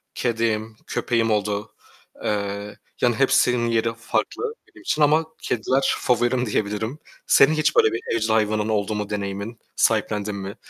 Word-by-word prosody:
kedim, 110 -2 -1
köpeğim 115 -2 0
oldu. 105 0 -1 0.5
Eee, 100 0 -3 0.2
yani 120 -2 +3
hepsinin 125 -2 +3
yeri 115 0 +1
farklı 380 - -2
benim - - -17
için 240 - -1
ama 155 +2 +4 0.2
kediler 130 +4 +1
favorim 125 +1 +1
diyebilirim. 110 +6 -2 0.3
Senin 145 +3 +6
hiç 155 -1 +1
böyle 110 - +5
bir 115 - -2
evcil 110 0 0
hayvanın 110 0 +1
oldu 105 0 0
mu 105 0 -3
deneyimin? 100 +2 -4 0.2
Sahiplendin 105 -1 +1
mi? 100 0 -6
110 Hz, 140 wpm, -23 LUFS, 105-120 Hz, 0.5 s, Senin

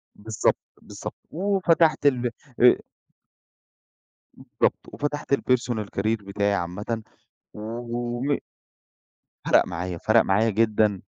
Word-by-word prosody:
بالضبط، 110 0 0 0.2
بالضبط، - - -8 0.2
وفتحت 170 -4 +2
ال 125 -4 +3 0.3
آآ 125 - +7 1.6
بالضبط - - -1
وفتحت 145 -1 -3
الpersonal 120 -5 +1
career 105 +1 0
بتاعي 100 +1 0
عامةً، 105 +5 -3 0.5
وم 120 +4 -3 1.1
فرق - - +4
معايا، 90 +1 -4
فرق 110 +5 +4
معايا 105 +4 +2
جدًا 105 -2 +2
115 Hz, 90 wpm, -25 LUFS, 105-125 Hz, 1.6 s, آآ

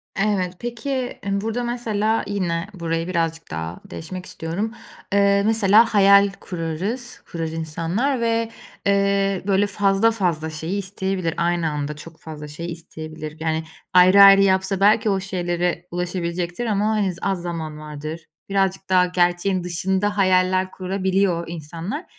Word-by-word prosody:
Evet. 195 -3 0
Peki, 240 +2 -5
eee, 245 -7 -2
burada, 225 +3 -2
mesela, 225 -2 0
yine 180 -4 -1
burayı 165 -2 -2
birazcık 165 -2 -2
daha 80 +2 -5
deşmek 180 +3 -7
istiyorum. 180 +8 -4 0.4
Eee, 200 0 +4
mesela 220 +1 +4
hayal 200 0 +6
kurarız, 185 +8 -4
kurar 165 -1 -3
insanlar 165 - -2
ve, 230 -1 +1 0.4
eee, 200 -1 +2
böyle 200 +1 +3
fazla 200 +2 +2
fazla 175 -8 -1
şeyi 160 +5 -4
isteyebilir, 190 -3 -2
aynı 170 -1 +1
anda 150 0 -3
çok 160 +2 -12
fazla 150 -2 -8
şey 170 +3 -6
isteyebilir. 155 -2 -8
Yani, 160 0 -1 0.3
ayrı 185 +2 +7
ayrı 195 0 +9
yapsa 190 0 +2
belki 210 +2 +4
o 195 -1 +1
şeylere 175 -2 -2
ulaşabilecektir 175 +3 -3
ama, 210 -2 +1
hani, 210 -4 +1
z - - -13
az 195 -3 -1
zaman 165 -3 -5
vardır. 155 +2 -7 0.2
Birazcık 195 -1 0
daha 185 -1 +5
gerçeğin 180 +1 +1
dışında 190 +4 -1
hayaller 185 -1 +3
kurabiliyor 190 -1 0
insanlar. 170 - -6
185 Hz, 140 wpm, -22 LUFS, 165-200 Hz, 0.4 s, ayrı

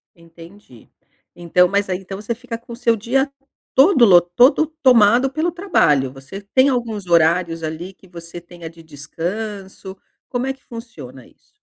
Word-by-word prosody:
Entendi. 170 - -17 0.5
Então 175 +1 +2
mas 200 +1 -1
aí 185 -1 -2
então 195 +1 -9
você 225 +2 -4
fica 235 -1 -8
com 235 +1 -13
o - - -7
seu 235 -1 +1
dia 265 +6 -1 0.4
todo 270 -2 +5
lo 180 -5 +7
todo 245 - +3 0.2
tomado 245 +1 +4
pelo 315 +5 -1
trabalho. 165 - +1
Você 135 +9 -10
tem 260 +1 +5
alguns 230 -7 -3
horários, 165 0 +2
ali, 160 +4 -6
que 190 - -22
você 170 0 -10
tenha 170 -1 -11
de 165 0 -16
descanso? 190 +6 -7 0.3
Como 245 +1 -3
é 270 - -1
que 270 - -22
funciona 230 0 -11
isso? - - -28
195 Hz, 165 wpm, -19 LUFS, 170-240 Hz, 0.5 s, lo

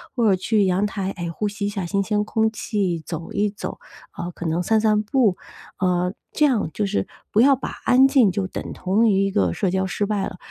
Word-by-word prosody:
或 235 -4 +2
者 190 - +4
去 205 +2 +1
阳 190 +2 +1
台， 195 -1 -3
哎， 175 -3 -5
呼 190 +6 -2
吸 205 0 -4
一 - - -1
下 200 -3 -4
新 200 +4 0
鲜 210 0 0
空 220 +1 0
气， 200 -6 -2
走 165 -1 -6
一 205 0 +1
走。 200 - -6 0.4
呃， 175 +1 -4
可 175 - -8
能 165 +3 0
散 220 +4 +2
散 215 -1 +2
步 215 -4 +2 0.4
呃， 180 0 +1 0.2
这 300 - +3
样 235 - +1
就 210 - -1
是 205 - -1 0.2
不 215 - +4
要 275 +2 +6
把 255 - -5 0.2
安 260 +2 +6
静 265 -7 +4
就 190 0 -2
等 - - -6
同 200 +5 +1
于 195 -1 +3
一 195 - -1
个 95 - +1
社 185 - 0
交 190 +1 0
失 205 +2 -1
败 205 -2 -1
了。 190 -3 -7
200 Hz, 250 characters per minute, -22 LUFS, 185-215 Hz, 0.4 s, 要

